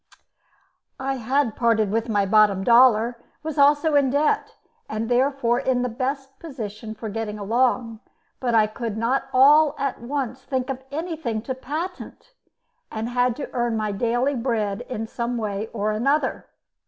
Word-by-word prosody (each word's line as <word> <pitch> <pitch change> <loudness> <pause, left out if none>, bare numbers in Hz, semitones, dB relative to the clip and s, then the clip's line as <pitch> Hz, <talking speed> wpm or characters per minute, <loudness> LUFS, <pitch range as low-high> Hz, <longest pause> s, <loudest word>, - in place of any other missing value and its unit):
I 270 0 -2
had 255 0 0
parted 225 -4 +2
with 225 +2 -1
my 205 -2 +2
bottom 205 -1 +4
dollar, 235 0 +4 0.2
was 310 -2 -4
also 290 +2 +4
in 280 -2 +4
debt, 290 +3 0 0.3
and 220 +2 -3
therefore 250 -1 +2
in 260 -2 0
the 250 - -1
best 270 +3 -4
position 220 -7 -7
for 220 +1 -7
getting 215 0 -4
along; 230 +1 0 0.4
but 240 -3 0
I 220 -1 +5
could 220 0 -5
not 235 +4 0
all 290 +4 +6
at 275 -3 -3
once 260 0 -3
think 260 -1 -2
of 260 0 -6
anything 305 -8 -3
to 260 - -3
patent, 325 - -6 0.6
and 225 +1 -3
had 245 -1 +1
to 285 - -7
earn 240 -2 0
my 215 -1 -1
daily 240 +6 0
bread 230 -5 -1 0.3
some 240 +1 -3
way 210 -1 -3
or 215 -1 -1
other. 275 +8 0
245 Hz, 155 wpm, -23 LUFS, 220-270 Hz, 0.6 s, all